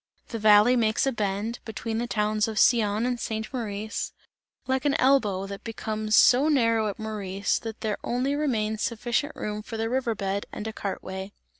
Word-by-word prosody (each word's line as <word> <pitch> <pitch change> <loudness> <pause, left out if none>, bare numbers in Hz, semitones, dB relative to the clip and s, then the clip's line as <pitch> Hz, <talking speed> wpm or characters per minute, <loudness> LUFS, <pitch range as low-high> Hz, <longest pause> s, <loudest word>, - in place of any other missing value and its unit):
The 230 - -4
valley 215 +3 +6
makes 220 0 +2
a 270 - +2
bend, 215 +1 -2
between 220 0 -4
the 240 - -2
towns 210 -1 +1
of 220 -1 -5
Sion 215 -1 +3
and 245 -1 -1
St. 220 +2 -4
Maurice, 215 -3 -4 0.5
like 260 +1 0
an 285 -1 +2
elbow 225 -8 +3
and 195 0 -7
becomes 215 -1 -2
so 255 +6 +6
narrow 230 -6 +3
at 200 - -4
Maurice, 205 -3 -2
that 225 -1 -7
there 215 -2 -2
only 255 +4 0
remains 220 -7 -1
sufficient 240 +5 -1
room 210 0 -4
for 225 +1 -7
the 225 +1 -2
river 245 -3 0
bed 195 0 -2
and 210 - -6
a 220 - -4
cart 200 -2 -4
way. 190 +1 -6
220 Hz, 185 wpm, -26 LUFS, 210-240 Hz, 0.5 s, valley